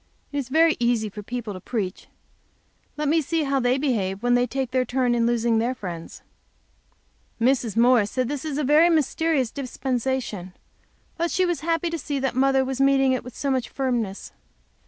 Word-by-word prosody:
It 290 - -4
is 260 -2 -5
very 320 +3 +4
easy 235 -3 +1
for 210 +1 -8
people 235 0 -5
to 185 - -7
preach. 195 -2 -4 0.9
Let 300 0 -1
me 320 +2 +3
see 320 +2 -1
how 275 -1 +1
they 250 +1 +2
behave 210 -8 -1
when 245 0 +3
they 245 0 +3
their 260 -1 -1
turn 250 0 0
to 240 - +1
lose 235 0 +1
their 235 +2 +1
friends. 175 -7 -8 1.2
Mrs. 235 -2 +1
Morris 235 -3 +4
said 255 +1 -1
this 280 0 -4
was 300 -3 -3
a 300 - 0
very 300 +5 +5
mysterious 310 -4 +1
dispensation. 255 -7 -3 0.6
But 340 - 0
that 340 - -2
she 370 - +2
was 350 -4 -1
happy 330 +2 -1
to 335 - -3
see 290 -2 -3
that 270 -1 -1
Mother 265 +1 +3
was 265 0 -2
meeting 270 -1 +4
it 255 - -1
with 250 - -10
so 280 - -1
much 260 -2 -1
firmness. 240 -7 -2
255 Hz, 190 wpm, -24 LUFS, 235-280 Hz, 1.2 s, very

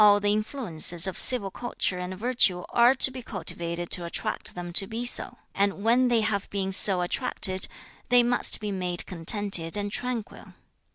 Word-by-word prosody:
the 205 0 0
influences 205 - 0
of 190 - -2
civil 210 -7 +4
culture 220 -6 -4
and 180 +1 -7
virtue 210 -6 +1
are 240 +2 +3
to 265 - +5
be 255 0 -8
cultivated 175 -4 -4
to 175 - 0
attract 170 - -5
them 175 -1 -8
to 195 +2 +2
be 230 +3 -5
so; 245 0 +4 0.2
and 200 0 -2
when 245 +3 +2
they 235 -2 +1
have 210 -2 -2
been 195 -1 -4
so 190 -1 +3
attracted, 190 -1 -3 0.4
they 245 0 +4
must 240 +1 0
be 210 -1 -5
made 180 -2 -3
contented 180 0 +1
and 205 0 -4
tranquil. 245 -1 -4
200 Hz, 170 wpm, -25 LUFS, 180-240 Hz, 0.4 s, to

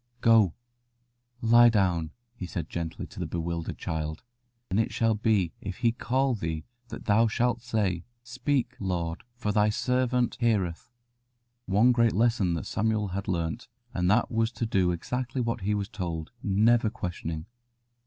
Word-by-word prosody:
"Go, 110 -7 +5 0.9
lie 120 +1 +7
down," 90 -7 +1 0.3
he 95 -6 -6
said 85 -1 -5
gently 85 -1 -4
to - - -11
the - - -2
bewildered 85 -1 -3
child, 80 +2 -4 0.5
"and 95 - +2
it 110 - +1
shall 115 -1 +2
be 105 -5 +1
if 95 -2 -5
He 115 - +2
call 130 +3 0
thee 80 -7 -3 0.2
that - - -8
thou 110 +2 +4
shalt 120 +2 0
say, 105 -8 -1 0.2
'Speak, 125 0 -1
Lord, 85 -3 -2
for 110 -4 -2
Thy 105 +1 +3
servant 125 +2 +1
heareth.'" 105 -6 0 0.8
One 105 +6 +5
great 115 -2 +3
lesson 105 -8 +1
Samuel 105 -1 0
had 95 +1 -4
learnt, 85 +5 -2 0.3
and 90 0 +1
that 110 +4 +3
was 115 0 +1
to 115 - -2
do 95 -5 +2
exactly 125 +9 -3
what 115 -2 -1
he 105 +2 0
was 100 -1 -2
told, 85 -7 -5
never 110 +3 +3
questioning. 85 -6 -5
105 Hz, 155 wpm, -28 LUFS, 90-120 Hz, 0.9 s, lie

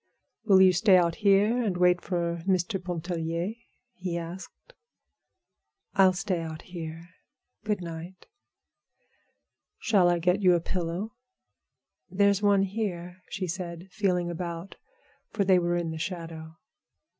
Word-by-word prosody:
"Will 190 -3 +6
you 185 -1 +6
stay 190 +1 +5
out 170 -2 +1
here 205 +4 +3
and 200 -6 -1
wait 180 0 +4
for 170 -2 -2
Mr. 185 0 0
Pontellier?" 170 +1 -3 0.4
he 180 -5 -4
asked. 175 - -9 1.2
"I'll 190 -2 +5
stay 185 -1 -2
out 160 -1 -6
here. 165 -2 -8 0.6
Good 210 -3 -1
night." 170 +2 -8 1.5
"Shall 195 -5 +3
I 175 - +2
get 180 +4 +1
you 180 -2 +5
a - - +2
pillow?" 180 +5 -3 1.0
"There's 200 +1 +2
one 200 -1 +4
here," 185 -3 -4
she 190 -1 -3
said, 175 0 -6
feeling 180 -4 0
about, 170 +2 -6 0.5
for 205 -3 -1
they 185 -1 +5
were 175 0 0
in 170 -2 -2
the 160 - -6
shadow. 165 -2 -6
180 Hz, 130 wpm, -27 LUFS, 170-195 Hz, 1.5 s, Will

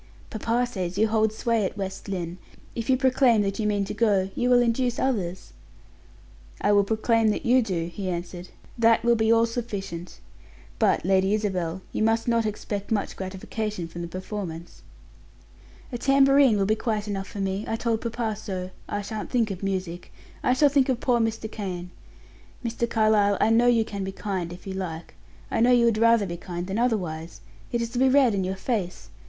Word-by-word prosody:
"Papa 230 +3 0
says 185 -6 -4
you 220 +2 +4
hold 220 0 +2
sway 230 0 0
at 195 - -3
West 190 0 -5
Lynne. 180 -2 -4 0.3
If 230 +1 -5
you 260 - +4
proclaim 255 -4 +3
that 195 +1 -2
you 215 - 0
mean 205 -1 +1
to - - -5
go, 200 -4 +1
you 245 0 0
will 245 -1 +6
induce 240 +1 0
others." 190 -9 -2 1.1
"I 205 - +2
will 205 -1 +5
proclaim 225 +2 +2
that 215 +5 0
you 250 +2 +5
do," 185 -7 -2
he 185 +3 -5
answered; 175 0 -5 0.3
"that 230 0 +4
will 235 0 +4
be 220 -1 +2
all 230 0 +5
sufficient. 200 -8 -5 0.6
But, - - +2
Lady 190 +2 +3
Isabel, 185 -4 -2
you - - -3
must 225 +1 +2
not 230 -2 +2
expect 205 -1 -5
much 210 -2 -1
gratification 190 0 -4
from 170 +1 -8
the 170 - -4
performance." 180 -2 -7 1.1
"A 240 - -4
tambourine 275 -3 +5
will 195 - +1
be 215 - +2
quite 220 -1 -2
enough 195 -1 -3
for 210 - -8
me; 195 +1 -1
I 225 - -1
told 225 -1 -1
papa 230 -2 -2
so, 190 -3 -5 0.2
I 205 0 -2
shan't 215 +1 -5
think 230 -4 +1
of 185 - -6
music; 185 -3 -4 0.3
I 250 - +2
shall 285 +3 +4
think 275 -1 +2
of 250 -2 +1
poor 245 -2 +2
Mr. 225 -1 -1
Kane. 180 -4 -5 0.7
Mr. 235 0 -1
Carlyle 215 -3 +3
I 220 - +3
know 235 +2 +4
you 230 -2 +4
can 200 -2 -5
be 190 - -3
kind 190 -3 -4
if 175 +1 -11
you 195 - -5
like; 175 -4 -5 0.4
I - - 0
know 245 +2 +5
you 240 -1 +5
would 225 -2 +2
rather 230 -2 +4
be 175 -2 -5
kind 175 0 -5
than 195 +4 -3
otherwise 170 - -2 0.3
it 235 -1 0
is 230 - -5
to 245 - -2
be 265 0 +5
read 260 -4 +4
in 195 -1 0
your 190 +1 -2
face. 190 -4 -3
210 Hz, 200 wpm, -25 LUFS, 190-230 Hz, 1.1 s, will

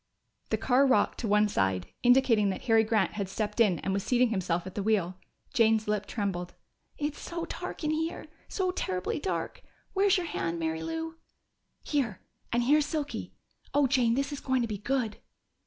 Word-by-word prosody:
The - - +1
car 270 +2 +3
rocked 260 - +2
to 230 - -2
one 210 +1 +4
side, 95 - 0
indicating 245 -5 +4
that 190 - -4
Harry 225 -2 +4
Grant 215 -4 +1
had 200 -3 -3
stepped 210 +2 -3
in 205 -7 +4
and 190 - -1
was 200 - 0
seating 250 -1 +3
himself 180 -5 -1
at 190 - -7
the 205 - -2
wheel. 195 -4 +1 0.4
Jane's 225 -4 +3
lip 210 -1 -1
trembled. 190 -5 -3 0.4
"It's 295 0 -3
so 340 -1 -4
dark - - -6
in 305 - +1
here! 320 +2 -2 0.2
So 370 -2 -1
terribly 185 - -2
dark! 380 - -3 0.3
Where's 390 0 +4
your 360 - -2
hand, 170 - -2
Mary 160 -1 -2
Lou?" 325 0 -4 0.7
"Here 260 -10 -1 0.3
and 240 +1 +2
here's 295 +3 +4
Silky. 300 -2 -4 0.4
Oh, 290 -1 +5
Jane, 245 -3 +3
this 275 +3 -1
is 285 - -4
going 260 -2 +1
to - - -1
be 210 -3 -4
good!" 235 -1 -1
230 Hz, 185 wpm, -29 LUFS, 200-285 Hz, 0.7 s, Oh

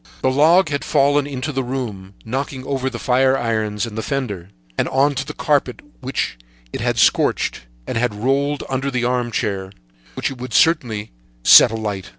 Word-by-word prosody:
The 130 - +3
log 160 +6 +4
had 145 -1 -2
fallen 145 0 +2
into 140 +1 -4
the 135 -2 -2
room, 110 -7 -5
knocking 130 +2 -4
over 135 -1 -1
the 120 - -6
fire 130 +2 +2
irons 110 -3 -1
and 115 -3 -8
the 110 - -2
fender, 110 - -4 0.3
and - - 0
on 140 +2 +2
to 135 0 -2
the 140 - -7
carpet, 145 -6 0 0.2
which 130 - -3 0.3
it - - -4
had - - 0
scorched, - - +1 0.2
and - - -2
had 120 -3 0
rolled 135 +6 0
under 135 +1 -2
an 125 -3 -1
armchair, 110 -6 -2 0.4
which - - -2
it 130 - -9
would 125 -2 -5
certainly 120 -10 +2 0.3
set - - +9
alight. 105 -4 -4
130 Hz, 175 wpm, -20 LUFS, 110-140 Hz, 0.4 s, set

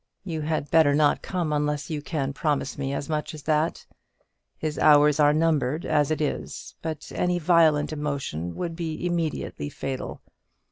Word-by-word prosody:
You 165 -5 -4
had 155 -1 -2
better 155 -3 +5
not 150 0 +3
come 175 -5 -2
unless 150 0 -1
you 150 -2 -2
can 140 -3 -2
promise 145 -2 -1
me 135 -1 -3
as 140 - -3
much 155 +1 -3
as 150 - -10
that. 155 +2 0 0.7
His 155 -1 -3
hours 150 0 +6
are 145 -1 +6
numbered, 155 -1 +1
as 150 -2 +2
it 155 0 -1
is; 150 - -4
but 160 -2 -5
any 180 0 +1
violent 160 -3 +3
emotion 140 - -3
would 170 -2 -4
be 165 0 -4
immediately 165 - -2
fatal. 135 - -5
150 Hz, 160 wpm, -25 LUFS, 145-160 Hz, 0.7 s, hours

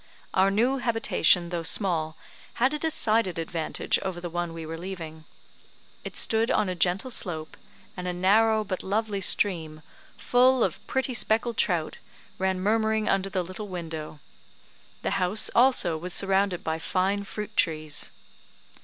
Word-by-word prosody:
Our 190 +1 +4
new 240 +7 +1
habitation, 225 -7 +2
though 175 -1 -3
small, 165 -3 0 0.4
had 260 +4 +2
a 300 - -2
decided 225 - +1
advantage 165 0 -1
over 190 -2 -4
the 175 -1 -6
one 175 0 -2
we 165 -1 -7
were 160 +1 -5
leaving. 165 -3 -8 0.8
It - - -6
stood 225 +1 +3
on 205 - +2
a 185 - -1
gentle 180 +7 0
slope; 160 -8 -2 0.4
and 180 -1 -5
a - - 0
narrow 215 +5 +3
but 190 -3 -4
lovely 205 0 -2
stream, 160 -6 0 0.3
full 250 0 +3
of - - -1
pretty 265 -1 0
speckled 230 0 +1
trout, 170 -4 0 0.4
ran 190 0 0
murmuring 220 +2 +1
under 195 0 +1
the 185 -1 -1
little 185 +4 -7
window; 160 -4 -6 0.8
the - - -1
house, 185 +4 +2
also, 235 -10 +4
was 180 +2 -2
surrounded 195 -2 +2
by 160 0 -2
fine 190 +5 0
fruit 210 +1 -7
trees. 155 -3 0
190 Hz, 150 wpm, -26 LUFS, 170-220 Hz, 0.8 s, Our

